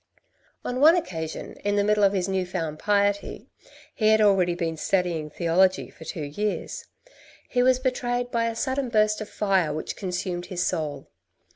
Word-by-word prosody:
On 250 +1 -2
one 315 +5 +7
occasion, 165 - -4
in 205 0 +1
the 205 - +3
middle 210 0 +2
of 195 - +5
his 185 -2 0
new 190 -1 0
found 160 -3 -4
piety 200 -1 0 0.5
(he 215 - +1
had 220 0 +5
already 190 -4 +3
been 165 -2 -2
studying 170 -2 -1
theology 180 +4 +1
for 160 - -13
two 160 - -5
years), 205 +9 -3 0.6
he 245 - +1
was 255 0 +4
betrayed 245 -1 -1
by 230 -1 +1
a 230 - -3
sudden 260 +1 -1
burst 215 -1 +2
of 215 - -6
fire 190 -6 +1
which 155 +1 -4
consumed 180 -2 -4
his 175 -1 -2
soul. 150 -5 -3
195 Hz, 170 wpm, -25 LUFS, 175-220 Hz, 0.6 s, one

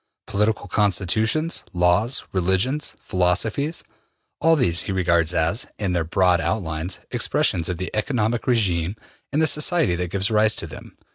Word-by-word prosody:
Political 105 0 0
constitutions, 110 - +1
laws, 90 +8 +2
religions, 95 +11 0
philosophies 105 - 0 0.6
all 165 +1 +4
these 85 - +1
he - - -5
regards 85 -3 +2
as, 90 +8 0
in 100 -4 -2
their 85 -2 +1
broad 90 +1 +2
outlines, 85 0 -2
expressions 85 -1 +1
of 90 - -2
the 95 +3 -5
economic 110 0 -1
regime 95 -7 +1 0.4
in 150 - +1
the - - +4
society 150 - +2
that 90 0 -2
gives 100 +3 -1
rise 110 0 +3
to - - -2
them. - - -11
100 Hz, 145 wpm, -22 LUFS, 90-115 Hz, 0.6 s, all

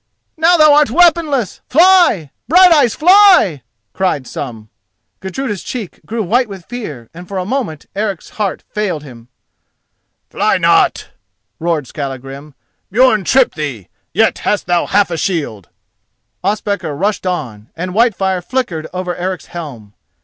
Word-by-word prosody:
"Now 335 +2 +4
thou 305 -2 +6
art 295 -2 +4
weaponless, 310 - +2
fly! 335 - +4 0.2
Brighteyes; 320 - +5
fly!" 360 - +5 0.3
cried 185 -8 -1
some. 115 -5 -7 0.5
Gudruda's 205 +1 -4
cheek 225 -8 -7
grew 225 0 -2
white 235 +5 +1
with 190 -4 -10
fear, 155 - -7
and 175 +2 -11
for 195 - -5
a 185 - -2
moment 210 - -3
Eric's 200 -3 -3
heart 200 -3 -2
failed 195 -8 -2
him. 120 -5 -13 1.0
"Fly - - +1
not!" - - +2 0.5
roared 165 -3 -1
Skallagrim. 135 +1 -7 0.4
"Björn 220 -1 +3
tripped 260 +4 +3
thee. 140 - -5 0.2
Yet - - +1
hast 210 - -1
thou 175 -1 0
half 200 -2 +2
a 170 - -2
shield!" 145 - -3 0.7
Ospakar 200 -5 -2
rushed 195 +3 -1
on, 120 - -4
and 180 +3 -4
Whitefire 195 -4 +1
flickered 175 -7 -3
over 180 -1 -4
Eric's 185 +1 -4
helm. 130 -12 -8
190 Hz, 135 wpm, -15 LUFS, 155-245 Hz, 1.0 s, thou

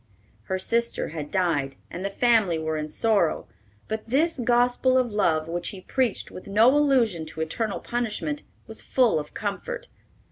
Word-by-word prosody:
Her 190 - -1
sister 235 +5 0
had 150 -2 -6
died, 155 -8 0 0.2
and 180 - -5
the 200 - -1
family 220 -5 +3
were 160 0 -2
in 155 0 -3
sorrow; 205 -2 +1 0.4
but 220 0 -4
this 290 +3 +1
gospel 245 +2 +3
of 250 -3 +1
love, 165 -7 +1
which 175 +1 -3
he 190 - -8
preached 250 +1 -1
with 185 - -10
no 220 +7 +5
allusion 255 - +3
to 160 +1 -6
eternal 190 +4 -2
punishment, 240 +5 -2 0.2
was 220 0 -5
full 245 -10 +2
of 150 - -9
comfort. - - -4
215 Hz, 165 wpm, -25 LUFS, 170-245 Hz, 0.4 s, no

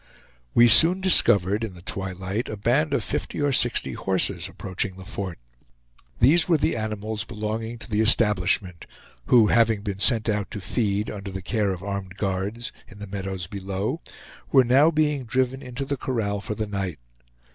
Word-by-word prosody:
We 120 0 +7
soon 165 - +6
discovered, 105 - +3
in 105 -5 -5
the 85 - -14
twilight, 95 +4 -4
a 110 - -5
band 130 +9 +1
of 140 - 0
fifty - - -3
or 145 -1 +1
sixty 120 - +1
horses 95 +5 -1
approaching 95 0 -4
the 95 0 -11
fort. 95 -3 -5 0.8
These 160 +8 +4
were 165 - +5
the - - 0
animals 110 -1 -3
belonging 110 +1 -4
to 115 - -11
the 110 -2 0
establishment; 100 -5 +1 0.4
who 120 -3 +6
having 115 -3 +3
been 100 -2 -4
sent 115 +1 +2
out 105 -2 -1
to 105 - -6
feed, 105 0 -1
under 100 -1 -7
the 95 0 -6
care 105 -1 0
of 95 -1 -6
armed 100 -1 -5
guards, 100 +5 -3 0.2
in 100 - -14
the 105 - -7
meadows 95 -2 -5
below, 100 - -4 0.5
were 135 -2 +6
now 135 +6 +5
being 150 -4 0
driven 130 +2 0
into 125 +2 -5
the 140 0 -2
corral 105 -6 -2
for 105 - -4
the 110 - -2
night. 100 -5 -4
105 Hz, 175 wpm, -24 LUFS, 95-120 Hz, 0.8 s, We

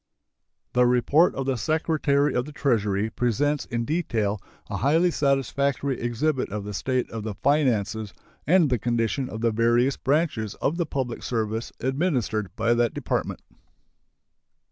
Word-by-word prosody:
The 125 0 +4
report 130 +7 +3
of 135 - -3
the 135 -2 0
Secretary 150 +1 +1
of 125 - 0
the 150 - -9
Treasury 110 -7 0
presents 140 +5 0
in 115 0 -3
detail 110 - -1 0.3
a - - -4
highly 165 +7 +3
satisfactory 140 -1 0
exhibit 130 +4 0
of 105 0 -4
the 105 +1 -6
state 130 +5 -1
of 115 - -5
the 105 -1 -5
finances 110 -7 +1 0.4
and 165 -3 +4
the 125 - +2
condition 120 +3 -1
of 110 - -6
the 115 -1 +2
various 120 +4 +2
branches 135 - 0
of 160 - -1
the 170 -3 -1
public 130 -5 -3
service 110 -1 -2
administered 130 - 0
by 115 +1 +2
that 120 -1 +1
Department. - - -2
125 Hz, 145 wpm, -25 LUFS, 110-145 Hz, 0.4 s, The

